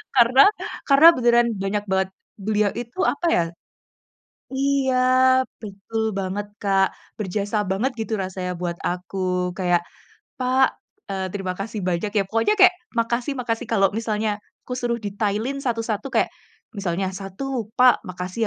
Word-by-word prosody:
karena 255 +2 +6 0.5
karena 280 +3 +8
beneran 240 -1 +4 0.2
banyak 205 +1 -1
banget 190 0 +1 0.3
beliau 210 0 +1
itu 240 +7 -7
apa 320 - -5
ya 170 - +3 1.1
iya 270 -1 +1 0.7
betul 215 +2 -4 0.2
banget 195 +2 -3 0.2
Kak, 195 -1 +3 0.3
berjasa 205 +1 -2
banget 225 +8 0
gitu 220 - -3
rasanya 185 -1 -4
buat 170 -1 -2
aku. 180 +2 -3 0.4
Kayak 175 -2 +2 0.6
“Pak, 260 +1 +4 0.4
eee, 190 -1 -2
terima 190 -2 -3
kasih 210 +2 -4
banyak 175 +3 0
ya,” 205 - +4
pokoknya 225 - +2
kayak 370 -1 +8 0.3
makasih 235 +4 0
makasih. 235 0 -2
Kalau 195 -3 +4
misalnya 220 -1 -1 0.4
kusuruh 245 -1 -1
detailin 210 +6 -1
satu 235 -3 0
satu 225 +4 -3
kayak - - +2 0.5
misalnya 190 -1 -1
satu, 225 +4 -4
“Pak 250 -1 +6
makasih 180 +3 -6
215 Hz, 135 wpm, -23 LUFS, 195-245 Hz, 1.1 s, karena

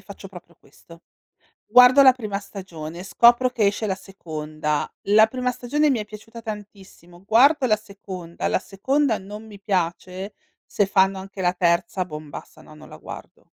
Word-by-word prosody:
faccio 200 -1 -11
proprio 180 -2 -14
questo. 170 0 -18 0.6
Guardo 250 +4 +7
la 265 -2 +8
prima 215 -5 -4
stagione, 175 -5 -9
scopro 235 +7 +4
che 225 -4 +1
esce 205 +2 -1
la 200 -3 0
seconda, 155 -5 -4 0.2
la 215 +2 +6
prima 250 +2 -2
stagione 280 +5 0
mi 260 - +1
è 210 - -5
piaciuta 215 +2 -11
tantissimo, 200 -5 -10
guardo 255 +7 +4
la 215 -3 +3
seconda, 190 -5 -7
la - - +1
seconda 230 +6 0
non 205 +3 -10
mi 205 -2 -13
piace, 185 0 -3 0.3
se 205 - 0
fanno 195 0 +2
anche 190 0 -8
la 180 - +2
terza, 175 +1 0
bon, 150 -3 -9
basta, - - -11
no, - - -16
non 155 - -14
la - - -11
guardo. - - -11
200 Hz, 170 wpm, -23 LUFS, 180-225 Hz, 0.6 s, la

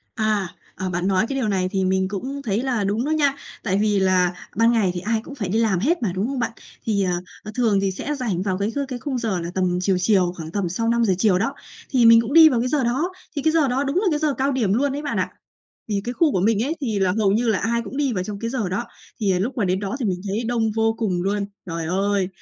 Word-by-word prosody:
À, 215 -4 0 0.3
ờ, 185 0 -4
bạn 175 0 -1
nói 195 +3 +2
cái 275 - -2
điều 240 -5 0
này 185 -2 0
thì 190 0 -1
mình 190 0 +1
cũng 260 +8 -5
thấy 220 -2 -1
là 245 -6 0
đúng 210 +5 0
đó 295 - -2
nha, 290 -3 +2 0.3
tại 195 -3 0
vì 210 -1 +2
là 185 -2 +2 0.2
ban 230 +2 +4
ngày 215 -6 +2
thì 180 - -3
ai 220 +4 0
cũng 285 - -9
phải 215 -9 -4
đi 210 +5 0
làm 220 -5 +2
hết 310 - +1
mà, 200 -6 0
đúng 195 +3 -1
không 270 +1 -3
bạn? 240 - 0 0.4
Thì, 205 -3 +1
ờ, 180 - 0 0.3
ờ, 210 - -7
thường 220 -5 +2
thì 195 -1 0
sẽ 285 +10 -4
rảnh 225 -10 -2
vào 190 -2 -1
cái 200 +2 0
kh 255 - -5
cái 255 -2 -4
khung 265 0 -3
giờ 215 -7 -1
là 170 0 -4
tầm 180 -1 +1
chiều 185 0 +1
chiều, 180 -2 +2
khoảng 160 -2 -7
tầm 195 0 -1
sau 225 +7 -1
5:00 230 -4 +3
chiều 195 -3 +3
đó, 225 +8 -1 0.4
thì 250 -4 +4
mình 230 0 +8
cũng 230 +3 -4
đi 320 0 +9
vào 250 -6 +1
cái 250 - 0
giờ 275 -1 +1
đó, 275 +10 0 0.2
thì 285 - -1
cái 315 +2 +3
giờ 315 -4 +3
đó 260 +3 0
đúng 275 +3 -2
là 395 +3 +2
cái 300 - +1
giờ 300 -2 +1
cao 270 +2 0
điểm 230 -7 +1
luôn 275 +4 +1
ấy 290 - -4
bạn 290 - -3
ạ. - - -1 0.6
Thì 200 -1 0
cái 245 - -2
khu 305 +3 +2
của 185 - +1
mình 215 +2 +2
ấy 310 +5 -2
thì 225 -7 -1
là 190 -2 +2
hầu 200 -3 +3
như 230 +3 +1
là 215 -4 +2
ai 235 +3 0
cũng 230 +4 -8
đi 280 -3 +1
vào 185 -4 -2
trong 205 +1 -5
cái 230 - -2
giờ 235 -7 -1
đó, 190 +6 -2 0.4
thì 195 -4 +2
lúc 240 +8 -2
mà 225 - +1
đến 185 +1 0
đó 200 +3 -3
thì 240 - 0
mình 180 -2 -1
thấy 210 +5 -2
đông 230 -1 0
vô 225 +1 +1
cùng 185 -6 0
luôn. 200 +1 -1 0.2
Trời 165 -2 -4
ơi! 195 +2 0
220 Hz, 290 wpm, -22 LUFS, 190-250 Hz, 0.6 s, đi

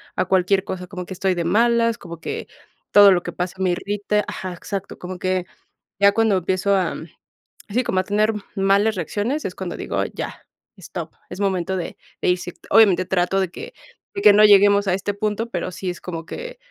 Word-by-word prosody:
A - - +1
cualquier 190 +1 +2
cosa, 180 -2 -6
como 180 -2 -7
que 190 - -7
estoy 190 0 0
de 170 - -1
malas, 230 +5 +2
como 170 -1 -10
que, - - -5 0.4
todo 205 -1 +8
lo 180 -2 +3
que - - -6
pasa 180 +1 -3
me 185 -1 +1
irrita. 205 +3 -1
Ajá, 185 -1 -5
exacto, 195 +2 -6
como 180 0 -7
que 185 -1 -1 0.6
ya 200 0 +7
cuando 220 -1 +3
empiezo 190 +3 +1
a 185 -4 0 0.7
sí, 245 +5 +1
como 190 -6 0
a - - +1
tener 210 +2 +1 0.2
malas 200 +2 +2
reacciones, 210 - -2
es - - -3
cuando - - -5
digo:, - - -2
"¡ya, - - -6 0.3
stop!" - - -7 0.2
Es - - -8
momento 190 -2 0
de 175 - -5 0.2
de - - 0
ir 180 - +3
si 175 0 -7 0.2
Obviamente, 200 -5 +5
trato 185 +1 +1
de 185 - -1
que - - -9 0.4
de 400 - -4
que 210 - +8
no 210 +1 +7
lleguemos 200 0 +6
a 180 - +2
este 195 +2 -2
punto, 215 +3 -2
pero 180 -1 -3
sí 185 +1 -5
es 175 - -5
como 165 -2 -6
que - - -7
195 Hz, 205 wpm, -22 LUFS, 180-210 Hz, 0.7 s, todo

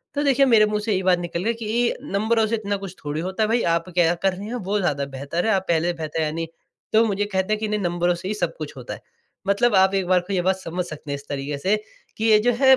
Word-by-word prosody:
तो 290 - +1
देखिए 275 -1 +4
मेरे 225 -5 +6
मुँह 210 0 -1
से 225 - 0
यही 190 -2 +1
बात 180 -1 +3
निकल 175 0 -3
गई 230 - +1
कि 230 +1 0
नंबरों 220 -2 +1
से 230 - 0
इतना 205 -2 -2
कुछ 195 -2 -8
थोड़ी 150 +1 -3
होता 190 +5 -1
है 215 - +1
भई, 235 +1 +2
आप 170 +1 +1
क्या 175 -1 +3
कर 190 +2 +1
रहे 195 +3 -7
हैं 240 - -4
वो 205 -2 -1
ज़्यादा 145 -7 0
बेहतर 140 +5 -3
है। 220 - +4
आप 190 -1 0
पहले 170 0 +2
से 175 - +1
बेहतर 160 0 -3
है 150 - -1
नहीं? 165 +1 -3 0.5
तो 225 +1 +6
मुझे 205 -1 0
कहते 190 0 0
हैं 215 - -1
कि 220 - -1
नहीं 210 0 -1
नंबरों 175 -1 +1
से 175 - -7
ही 205 - -1
सब 210 - -2
कुछ - - -6
होता - - -6
है। - - -10 0.5
मतलब 210 +3 +3
आप 190 +1 +5
एक 190 -2 0
बार 185 0 +4
को 200 - -3
ये 185 - +2
बात 190 +2 +2
समझ 180 0 -3
सकते 155 -3 -8
हैं - - 0
इस 140 0 -11
तरीके 140 0 -3
से 190 +9 +2 0.4
कि 220 - -1
ये 215 -1 +6
जो - - +3
है 265 -1 +7
190 Hz, 295 wpm, -23 LUFS, 170-215 Hz, 0.5 s, है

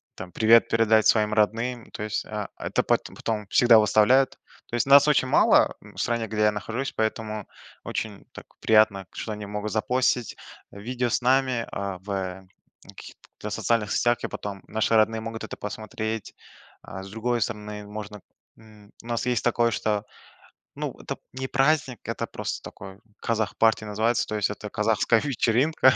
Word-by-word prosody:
там 90 -1 -9
привет 115 +1 +5
передать 110 -1 +3
своим 110 -1 +3
родным. 115 +3 0
То - - -6
есть, 105 0 -3
а, 105 -1 -5
это - - -1
пат - - +1
потом 105 -3 -3
всегда 120 -2 +6
выставляют. 110 +6 +4 0.4
То - - -5
есть 120 - +1
нас 140 +1 +7
очень 145 -3 +3
мало, - - +4
м, - - -16
в - - -18
стране, 115 -1 -1
где 105 0 -2
я 105 - +5
нахожусь, 115 +6 -4
поэтому 110 -1 -3 0.4
очень 105 -3 -5
так - - -11
приятно, 110 -3 +3
что 110 - -5
они 105 0 -6
могут 105 +1 -4
запостить 125 +2 0 0.4
видео 120 +4 -3
с 115 - 0
нами, 130 -1 +2
а, 100 -2 -4
в, 95 - -14
э, 95 -1 -3 0.4
в - - -21
каких-то 105 - -11
социальных 110 0 0
сетях, 120 -1 +2
и - - -1
потом 100 -2 -6
наши 110 +1 +1
родные 110 0 +3
могут 110 0 -6
это 110 - -7
посмотреть. 110 +1 -5 0.5
А 95 -1 -8
с 95 - -10
другой 115 +3 -1
стороны 105 -1 -4
можно, 105 -1 -8 0.4
м, 105 -2 -18
у - - -13
нас 120 0 -2
есть 125 -2 0
такое, 120 -1 +2
что, 105 -1 -1 0.7
ну, - - -4
это - - -6 0.2
не 130 +1 -4
праздник- 135 -2 +1
это - - -4
просто - - -5
такой 95 +1 -10 0.2
"Казах 110 -2 -2
партия" 110 -1 +3
называется. 110 +3 0
То 110 - -3
есть 105 -1 +1
это 105 0 -6
казахская 110 +1 +2
вечеринка. 130 +1 +3
110 Hz, 175 wpm, -25 LUFS, 105-120 Hz, 0.7 s, нас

